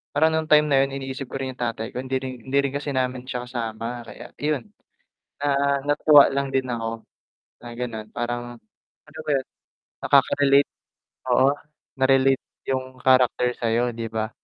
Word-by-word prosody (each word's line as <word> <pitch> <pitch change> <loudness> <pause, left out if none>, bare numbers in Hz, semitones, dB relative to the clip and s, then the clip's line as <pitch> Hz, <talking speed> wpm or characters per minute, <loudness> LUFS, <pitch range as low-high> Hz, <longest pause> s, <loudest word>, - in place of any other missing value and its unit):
parang 160 +2 +4
nung 160 0 -1
time 150 0 +6
na 135 - +5
yun 135 0 -3
iniisip 135 0 -5
ko - - -9
rin 130 -1 -3
yung - - -36
tatay 115 -1 -3
ko 125 - -4
hindi 130 0 -3
rin 130 -2 -8
hindi 140 - +1
rin 140 0 -2
kasi 145 0 -3
namin 125 -1 -1
siya 125 -1 -4
kasama. 115 0 -4
Kaya - - -10
iyon 150 -4 -2 0.7
na 140 -1 +2
natutuwa 145 0 +6
lang 140 0 -1
din 135 -1 0
ako 115 -1 -4 0.6
na - - -8
gano'n 115 -3 -5
parang 120 0 -4 0.5
ano 160 - -14
ba - - -4
yun, 135 -2 +1 0.6
nakakarelate 140 0 +4 0.6
oo, 130 +2 +5 0.5
na-relate 135 0 +4 0.3
yung 130 -1 -3
character 130 -1 +4
sa'yo, 120 +1 +1
di 115 -1 -4
ba? 110 0 -2
130 Hz, 165 wpm, -24 LUFS, 120-140 Hz, 0.7 s, time